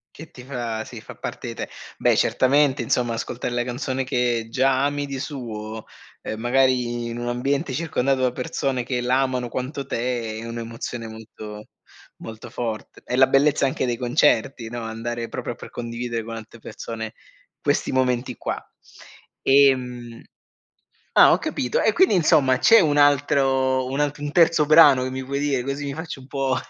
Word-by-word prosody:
Che 160 Hz, +1 st, -11 dB
ti 125 Hz, -7 st, -13 dB
fa 120 Hz, -4 st, -4 dB
sì, -, -, -10 dB
fa -, -, -11 dB
parte -, -, -6 dB
di -, -, -4 dB
te. -, -, -6 dB, 0.3 s
Beh, -, -, +3 dB
certamente, 140 Hz, +1 st, +3 dB
insomma, 120 Hz, -2 st, 0 dB
ascoltare 120 Hz, +1 st, -4 dB
la 120 Hz, 0 st, 0 dB
canzone 130 Hz, +2 st, -3 dB
che 125 Hz, -3 st, 0 dB
già 130 Hz, +2 st, +2 dB
ami 145 Hz, 0 st, 0 dB
di 140 Hz, -1 st, -5 dB
suo, 110 Hz, -6 st, -6 dB, 0.4 s
ehm, 110 Hz, -, -4 dB
magari 120 Hz, 0 st, +1 dB
in 115 Hz, 0 st, -5 dB
un 120 Hz, 0 st, -3 dB
ambiente 135 Hz, +4 st, -1 dB
circondato 135 Hz, -2 st, 0 dB
da 130 Hz, -1 st, +1 dB
persone 130 Hz, 0 st, -2 dB
che 125 Hz, 0 st, -2 dB
la 125 Hz, +2 st, +2 dB
amano 130 Hz, -2 st, -1 dB
quanto 130 Hz, +3 st, -4 dB
te, 115 Hz, -3 st, -2 dB
è -, -, -7 dB
un'emozione 115 Hz, 0 st, -6 dB
molto, 110 Hz, -1 st, -10 dB, 0.5 s
molto 110 Hz, +1 st, -9 dB
forte. 115 Hz, -2 st, -5 dB
È 125 Hz, -, -2 dB
la 130 Hz, +1 st, +6 dB
bellezza 140 Hz, +2 st, +3 dB
anche 135 Hz, -, -1 dB
dei 120 Hz, -1 st, 0 dB
concerti, 120 Hz, 0 st, +1 dB
no, 120 Hz, 0 st, -5 dB
andare 115 Hz, +1 st, -4 dB
proprio 120 Hz, 0 st, -5 dB
per -, -, -11 dB
condividere 115 Hz, -1 st, -4 dB
con 115 Hz, 0 st, -6 dB
altre 115 Hz, +1 st, -10 dB
persone 110 Hz, 0 st, -7 dB, 0.5 s
questi -, -, 0 dB
momenti 125 Hz, -1 st, 0 dB
qua. -, -, -4 dB, 0.8 s
Ehm, 125 Hz, -4 st, +2 dB, 0.9 s
ah, -, -, +7 dB
ho -, -, +5 dB
capito 125 Hz, -, -2 dB
e, 220 Hz, -, +3 dB
quindi, 375 Hz, -, +4 dB
insomma, 155 Hz, -7 st, +4 dB
c'è 230 Hz, -, +7 dB
un 150 Hz, -5 st, +2 dB
altro, 135 Hz, -2 st, +3 dB
un 135 Hz, +3 st, -3 dB
altr 145 Hz, 0 st, -1 dB
un 145 Hz, 0 st, -3 dB
terzo 165 Hz, -2 st, +4 dB
brano 150 Hz, -4 st, +7 dB
che 130 Hz, -, -2 dB
mi 130 Hz, +1 st, -4 dB
vuoi 140 Hz, +2 st, -3 dB
dire, 140 Hz, -3 st, 0 dB
così 140 Hz, +3 st, -4 dB
mi 140 Hz, -, -3 dB
faccio 160 Hz, -3 st, -7 dB
un 130 Hz, -, -14 dB
po' 135 Hz, -2 st, 0 dB
125 Hz, 175 wpm, -23 LUFS, 120-140 Hz, 0.9 s, ah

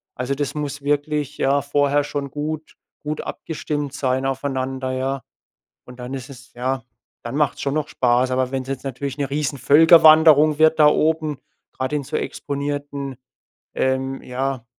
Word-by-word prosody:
Also 125 Hz, +2 st, -2 dB
das 145 Hz, 0 st, -2 dB
muss 145 Hz, -1 st, -4 dB
wirklich, 145 Hz, 0 st, -1 dB
ja, 140 Hz, +1 st, +2 dB
vorher 145 Hz, +1 st, +1 dB
schon 140 Hz, -1 st, -4 dB
gut 155 Hz, +2 st, -5 dB, 0.3 s
gut 150 Hz, +1 st, -3 dB
abgestimmt 150 Hz, -3 st, -4 dB
sein 130 Hz, -1 st, -1 dB
aufeinander, 135 Hz, -1 st, -2 dB
ja? 130 Hz, +1 st, -2 dB, 0.6 s
Und 125 Hz, 0 st, -13 dB
dann 125 Hz, +1 st, -6 dB
ist 130 Hz, 0 st, -6 dB
es 130 Hz, -1 st, -13 dB
ja, 130 Hz, +1 st, -2 dB, 0.4 s
dann 120 Hz, +3 st, -5 dB
macht's 145 Hz, -2 st, 0 dB
schon 140 Hz, 0 st, -1 dB
noch 155 Hz, -1 st, 0 dB
Spaß. 125 Hz, +1 st, +2 dB
Aber 130 Hz, 0 st, 0 dB
wenn's 130 Hz, -1 st, -3 dB
jetzt 135 Hz, -1 st, -4 dB
natürlich 135 Hz, 0 st, -4 dB
'ne 140 Hz, -1 st, -2 dB
Riesenvölkerwanderung 155 Hz, +2 st, +6 dB
wird 160 Hz, 0 st, +4 dB
da 150 Hz, -, +8 dB
oben, 155 Hz, -1 st, +1 dB, 0.3 s
grad 130 Hz, +1 st, -4 dB
in 150 Hz, -1 st, 0 dB
so -, -, -3 dB
exponierten, 140 Hz, -1 st, -4 dB, 0.6 s
ähm, 130 Hz, 0 st, -1 dB
ja, 130 Hz, -1 st, -3 dB
140 Hz, 155 wpm, -21 LUFS, 130-150 Hz, 0.6 s, da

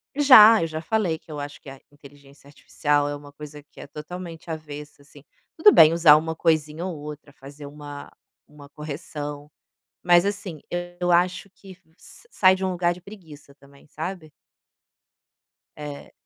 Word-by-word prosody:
Já. 230 Hz, -6 st, +8 dB
Eu 165 Hz, -, -1 dB
já 155 Hz, 0 st, -6 dB
falei 175 Hz, -3 st, -1 dB
que -, -, -16 dB
eu 150 Hz, -, -6 dB
acho 145 Hz, 0 st, -8 dB
que -, -, -12 dB
a 135 Hz, 0 st, -12 dB
inteligência 140 Hz, -1 st, -19 dB
artificial 145 Hz, 0 st, -1 dB
é 145 Hz, -, -4 dB
uma 145 Hz, 0 st, -13 dB
coisa 150 Hz, 0 st, -11 dB
que 150 Hz, -, -20 dB
é -, -, -10 dB
totalmente 165 Hz, +3 st, -9 dB
avessa 150 Hz, -2 st, -9 dB
assim, 145 Hz, 0 st, -18 dB, 0.3 s
tudo 370 Hz, +6 st, +6 dB
bem 160 Hz, -, +7 dB
usar 165 Hz, -3 st, +6 dB
uma 160 Hz, +1 st, -2 dB
coisinha 160 Hz, +1 st, -1 dB
ou 180 Hz, -4 st, -5 dB
outra, 150 Hz, 0 st, -10 dB
fazer 140 Hz, +2 st, -13 dB
uma 145 Hz, 0 st, -10 dB, 0.4 s
uma 145 Hz, -1 st, -16 dB
correção. 150 Hz, -1 st, -8 dB, 0.5 s
Mas 175 Hz, 0 st, +5 dB
assim, 200 Hz, -6 st, -5 dB, 0.4 s
eu 180 Hz, 0 st, 0 dB
acho 180 Hz, +3 st, +1 dB
que 195 Hz, -1 st, -15 dB, 0.2 s
sa 470 Hz, -, -18 dB
sai 190 Hz, -, +4 dB
de 190 Hz, 0 st, -5 dB
um 185 Hz, -, -1 dB
lugar 175 Hz, -1 st, 0 dB
de 180 Hz, -, -15 dB
preguiça 165 Hz, -8 st, -15 dB
também, 140 Hz, 0 st, -21 dB
sabe? 160 Hz, 0 st, -7 dB, 1.5 s
É. 145 Hz, -1 st, -9 dB
155 Hz, 165 wpm, -23 LUFS, 145-175 Hz, 1.5 s, Já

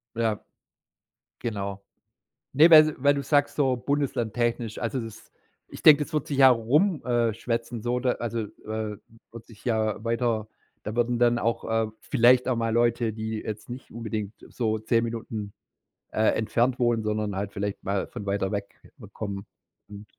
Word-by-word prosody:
Ja. 110 Hz, -2 st, -1 dB, 1.0 s
Genau. 100 Hz, -4 st, -4 dB, 0.7 s
Ne, 155 Hz, +5 st, +7 dB
weil 155 Hz, -1 st, +8 dB
weil 140 Hz, +2 st, +4 dB
du 140 Hz, -, -2 dB
sagst 145 Hz, +1 st, +1 dB
so 135 Hz, -3 st, +2 dB
bundeslandtechnisch, 120 Hz, -4 st, -1 dB
also 120 Hz, +3 st, -2 dB
das 115 Hz, -2 st, -9 dB, 0.4 s
ich -, -, -10 dB
denke, 150 Hz, -1 st, +8 dB
das 155 Hz, -, -13 dB
wird 150 Hz, -2 st, 0 dB
sich 140 Hz, -2 st, -3 dB
ja 135 Hz, -1 st, +9 dB
rum 140 Hz, -, +2 dB
äh, 120 Hz, -2 st, +2 dB
schwätzen 115 Hz, -1 st, -3 dB
so, 120 Hz, +1 st, 0 dB
da 125 Hz, -1 st, +1 dB
also, 115 Hz, 0 st, -4 dB
äh, 110 Hz, 0 st, -5 dB, 0.3 s
wird 115 Hz, -1 st, -11 dB
sich 110 Hz, -3 st, -17 dB
ja 110 Hz, -2 st, 0 dB
weiter 115 Hz, -2 st, 0 dB, 0.4 s
da 105 Hz, +2 st, -5 dB
würden 120 Hz, 0 st, +1 dB
dann 120 Hz, 0 st, +4 dB
auch, 115 Hz, 0 st, -1 dB
äh, 110 Hz, -1 st, 0 dB
vielleicht 125 Hz, +2 st, +4 dB
auch 130 Hz, -, +1 dB
mal 115 Hz, -1 st, -1 dB
Leute, 120 Hz, -1 st, +1 dB
die 110 Hz, 0 st, -4 dB
jetzt 105 Hz, +2 st, -7 dB
nicht 125 Hz, +2 st, -9 dB
unbedingt 110 Hz, -2 st, -4 dB
so 110 Hz, -3 st, -1 dB
10 115 Hz, +1 st, +1 dB
Minuten, 110 Hz, -3 st, -5 dB, 0.6 s
äh, 110 Hz, -, -1 dB
entfernt 120 Hz, +3 st, +1 dB
wohnen, 120 Hz, -2 st, +2 dB
sondern 105 Hz, -2 st, -2 dB
halt 100 Hz, +1 st, -3 dB
vielleicht 100 Hz, 0 st, -4 dB
mal 100 Hz, 0 st, -1 dB
von 100 Hz, -, -8 dB
weiter 100 Hz, -1 st, -1 dB
weg 100 Hz, -1 st, -5 dB, 0.3 s
kommen, 100 Hz, -2 st, -5 dB, 0.4 s
mhm. 105 Hz, 0 st, -10 dB
115 Hz, 165 wpm, -26 LUFS, 110-125 Hz, 1.0 s, ja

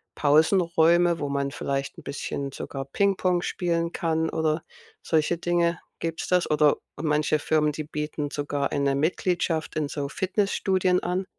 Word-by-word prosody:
Pausenräume, 170 Hz, +2 st, +4 dB
wo 145 Hz, -, -2 dB
man 140 Hz, 0 st, -1 dB
vielleicht 140 Hz, -1 st, -3 dB
'n -, -, -11 dB
bisschen 140 Hz, 0 st, -4 dB
sogar 135 Hz, -1 st, -5 dB
Pingpong 185 Hz, +2 st, +1 dB
spielen 170 Hz, -2 st, -1 dB
kann 160 Hz, -1 st, 0 dB
oder 155 Hz, 0 st, 0 dB, 0.4 s
solche 160 Hz, +1 st, +1 dB
Dinge. 170 Hz, -1 st, +1 dB, 0.2 s
Gibt's 165 Hz, -1 st, -3 dB
das? 180 Hz, -1 st, +2 dB
Oder 150 Hz, -1 st, +4 dB, 0.2 s
manche 150 Hz, 0 st, +1 dB
Firmen, 150 Hz, 0 st, +2 dB
die 155 Hz, -, -4 dB
bieten 150 Hz, -1 st, -4 dB
sogar 145 Hz, -1 st, -2 dB
eine 140 Hz, -1 st, +1 dB
Mitgliedschaft 165 Hz, +1 st, 0 dB
in 150 Hz, -2 st, 0 dB
so 140 Hz, -1 st, -3 dB
Fitnessstudien 190 Hz, 0 st, +1 dB
an. 180 Hz, +2 st, -1 dB
160 Hz, 140 wpm, -26 LUFS, 145-175 Hz, 0.4 s, Pausenräume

